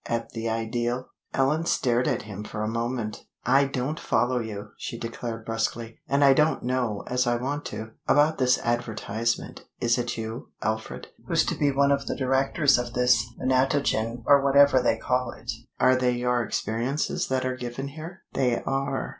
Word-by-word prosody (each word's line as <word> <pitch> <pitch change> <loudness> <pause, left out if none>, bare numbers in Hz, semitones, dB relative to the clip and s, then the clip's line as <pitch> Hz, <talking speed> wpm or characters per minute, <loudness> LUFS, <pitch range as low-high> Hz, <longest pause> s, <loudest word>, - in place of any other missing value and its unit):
at 115 0 -2
the 115 0 -3
ideal." 120 +3 -1 0.3
Ellen 145 +4 +1
stared 125 0 +2
at - - 0
him 105 -1 -7
for 105 0 -5
a - - -1
moment. 115 -1 -3 0.2
"I 140 +1 +5
don't 135 +3 -3
follow 125 +2 +1
you," 105 -3 -6
she 115 - -6
declared, 115 -1 -5
brusquely, 115 0 -3
"and 140 +1 +2
I 135 -1 +7
don't 150 +3 +2
know 125 -4 -1
as 125 0 0
I 120 - +3
want 140 +4 -3
to. 110 +1 -6 0.2
About 150 +1 +4
that 125 -1 +4
advertisement, 115 -1 -2 0.2
is 120 +1 +2
it 120 -1 -2
you, 115 +2 -5
Alfred, 110 0 -3 0.2
who's - - +2
to - - -1
be 145 - +2
one 140 +1 +3
of 140 0 0
the - - -1
directors 135 +1 +3
of 120 -1 -4
this 125 -2 +4
Menatogen 130 -3 +1
or 140 -1 +6
whatever 140 -1 +6
they 125 - +2
call 125 -1 -1
it? 120 +3 -6 0.3
Are 130 +1 +5
they 125 -1 +2
your 125 0 +1
experiences 120 +5 -1
that 130 -1 0
are 130 0 -1
given 125 +2 -5
here?" 165 +5 -9
"They 125 -3 +1
are!" 135 0 -1
125 Hz, 180 wpm, -26 LUFS, 115-135 Hz, 0.3 s, I